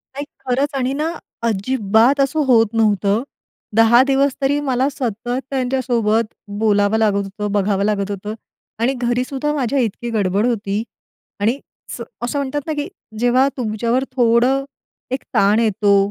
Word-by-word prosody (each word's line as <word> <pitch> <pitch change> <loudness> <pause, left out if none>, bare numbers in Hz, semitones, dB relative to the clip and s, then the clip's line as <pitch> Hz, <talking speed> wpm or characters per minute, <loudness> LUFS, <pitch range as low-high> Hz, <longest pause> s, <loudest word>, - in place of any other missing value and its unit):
नाही, 285 +1 -4 0.2
खरंच 265 +3 +1
आणि 260 0 0
ना, 310 +3 -1 0.4
अजिबात 225 +4 +2
असं 275 +3 +1
होत 230 -4 +5
नव्हतं. 210 -1 +2 0.5
10 225 +2 +6
दिवस 275 0 +2
तरी 285 +2 +2
मला 260 +2 +2
सतत 240 -3 -4 0.2
त्यांच्यासोबत 245 -4 0 0.3
बोलावं 205 0 +3
लागत 205 -2 +2
होतं, 205 +1 -4
बघावं 200 -1 +1
लागत 205 -1 0
होतं 205 +2 -5 0.5
आणि 260 +3 +2
घरी 245 0 0
सुद्धा 290 +2 -2
माझ्या 275 -1 0
इतकी 235 0 -2
गडबड 205 -1 +1
होती. 215 -3 -1 0.6
आणि 230 +7 +1 0.4
स - - -9 0.2
असं 245 +4 -1
म्हणतात 280 +1 -2
ना, 310 - -1
की 295 +2 -3 0.3
जेव्हा 250 +3 +4
तुमच्यावर 235 +2 0
थोडं 245 +2 +3 0.5
एक 260 - -2
ताण 205 +3 +4
येतो 210 -2 +3
235 Hz, 145 wpm, -19 LUFS, 210-265 Hz, 0.6 s, 10